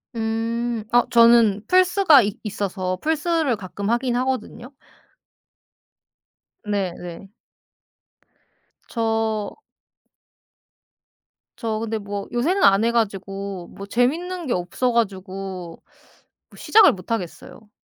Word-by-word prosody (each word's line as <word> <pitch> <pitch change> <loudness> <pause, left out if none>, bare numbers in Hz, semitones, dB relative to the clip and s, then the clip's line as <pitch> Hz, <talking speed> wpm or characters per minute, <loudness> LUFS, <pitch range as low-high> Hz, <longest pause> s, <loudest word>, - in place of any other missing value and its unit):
음. 230 +1 -2
아 240 0 +5
저는 230 -3 +5
플스가 365 - +5
이 205 0 -4
있어서 190 -3 -3
플스를 320 -3 0
가끔 200 0 -6
하긴 240 +1 0
하거든요. 255 0 -3 1.9
네네. 190 -2 -4 1.6
저 225 -2 -1 2.0
저 220 -2 -3
근데 225 0 -3
뭐 200 -1 -6
요새는 340 +11 0
안 195 +2 +5
해 230 - +2
가지고 195 -4 -3
뭐 200 - -10
재밌는 320 - -1
게 245 - 0
없어 180 +8 -1
가지고 190 -5 -3 0.7
뭐 - - -17
시작을 435 -1 +5
못 185 +3 -10
하겠어요. 210 +1 -6
225 Hz, 190 characters per minute, -22 LUFS, 195-245 Hz, 2.0 s, 아